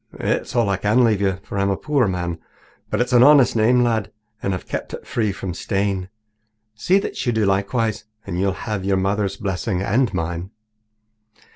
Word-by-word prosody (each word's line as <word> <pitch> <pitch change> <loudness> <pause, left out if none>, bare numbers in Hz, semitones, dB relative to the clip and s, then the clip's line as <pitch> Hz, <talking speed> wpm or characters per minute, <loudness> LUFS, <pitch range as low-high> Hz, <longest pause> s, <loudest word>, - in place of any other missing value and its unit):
It's - - -1
all 120 -3 +3
I 100 -1 +1
can 105 +6 +3
leave 110 -4 +2
you, 95 -2 +1
for 100 - -4
I'm 100 0 +1
a 100 - 0
poor 140 -6 +1
man, 85 -3 -3 0.5
but - - -1
it's 125 +1 -1
an 120 - +6
honest 140 -2 +6
name, 120 +3 +4
lad, 115 -4 0 0.3
and 95 - -1
I've 90 - -8
kept - - -4
it - - -12
free 110 -3 -1
from 95 -1 -5
stain. 95 +1 -2 0.6
See 175 - +2
that 200 - -3
you - - +3
do 110 -2 +1
likewise, 105 +3 0 0.2
and 85 - -4
you'll 95 +1 +2
have 105 -4 -3
your 95 0 +1
mother's 100 +1 0
blessing 95 -1 -2
and 120 +5 +1
mine." 85 +1 -3
100 Hz, 190 wpm, -21 LUFS, 95-115 Hz, 0.6 s, an